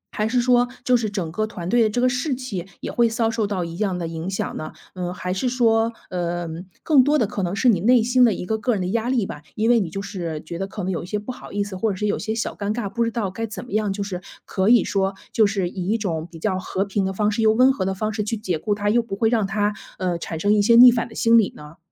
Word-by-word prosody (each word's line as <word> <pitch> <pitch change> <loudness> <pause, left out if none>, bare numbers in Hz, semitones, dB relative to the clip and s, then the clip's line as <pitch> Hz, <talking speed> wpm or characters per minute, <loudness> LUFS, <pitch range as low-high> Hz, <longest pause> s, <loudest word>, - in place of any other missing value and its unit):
还 215 - 0
是 245 +2 +1
说 245 0 +3 0.2
就 250 - +4
是 225 -3 0
整 185 -6 -3
个 215 +5 -1
团 180 -6 -7
队 240 +3 +3
的 220 - +4
这 215 - -2
个 250 - +3
士 255 +3 0
气 220 -9 -5
也 - - -4
会 235 -1 +3
遭 225 0 0
受 225 -2 -1
到 185 -4 -2
一 165 0 -7
样 195 -3 -1
的 170 -2 -3
影 165 +2 -5
响 195 - -3
呢？ 155 - -6 0.2
嗯， 180 -1 -4
还 180 0 -4
是 220 +7 -1
说， 230 -2 +2 0.2
呃， 175 -1 -2 0.4
更 285 -5 +5
多 295 +2 +3
的 240 - +2
可 200 0 -4
能 180 +1 -1
是 250 - +1
你 215 -7 +5
内 235 +4 +4
心 250 +1 +4
的 235 - +6
一 - - -5
个 220 +3 -1
个 245 +2 +1
人 195 - -1
的 - - -1
压 230 +4 -1
力 245 -6 +1
吧， 150 - -7
因 225 +3 +2
为 235 - +5
你 190 -6 -2
就 195 +4 -5
是 175 -6 -4
觉 170 +2 -6
得 195 - -2
可 200 0 -6
能 190 - -1
有 175 - -2
一 - - -9
些 210 - -2
不 210 +4 -5
好 - - -11
意 205 0 -1
思， 200 -1 -7
或 215 +4 0
者 200 - -2
是 210 - -3
有 205 - +1
一 - - -7
些 220 0 -3
小 225 - -2
尴 205 0 -3
尬， 235 -4 -2
不 235 +4 -1
知 230 - 0
道 220 -5 -2
该 225 +3 -4
怎 220 +3 -7
么 - - -14
样， 215 -1 0
就 200 +1 -3
是 185 -2 -5 0.2
可 190 +2 0
以 240 -1 +6
说 195 -1 -1 0.2
就 220 -2 +4
是 195 -3 -1
以 180 +1 -5
一 220 - +2
种 165 -7 -3
比 165 - -11
较 185 +2 -1
和 190 +1 -2
平 200 0 -1
的 190 - -1
方 210 +2 0
式， 225 - -1
又 220 -1 +5
温 255 +4 +5
和 265 - -2
的 190 0 -1
方 215 +2 -2
式 210 - -2
去 220 +2 -2
解 180 -7 -2
雇 205 +4 -1
他， 205 0 0
又 240 +2 +3
不 220 -4 -6
会 225 +2 +2
让 220 -4 +1
他， 205 +1 0 0.2
呃， 180 -2 -1
产 165 -1 -5
生 205 +5 +3
一 210 - +4
些 230 +3 +5
逆 245 +1 +10
反 240 -1 -1
的 220 - -13
心 230 0 +5
理 210 - +1
呢？ 150 +2 -12
210 Hz, 335 characters per minute, -22 LUFS, 185-230 Hz, 0.4 s, 逆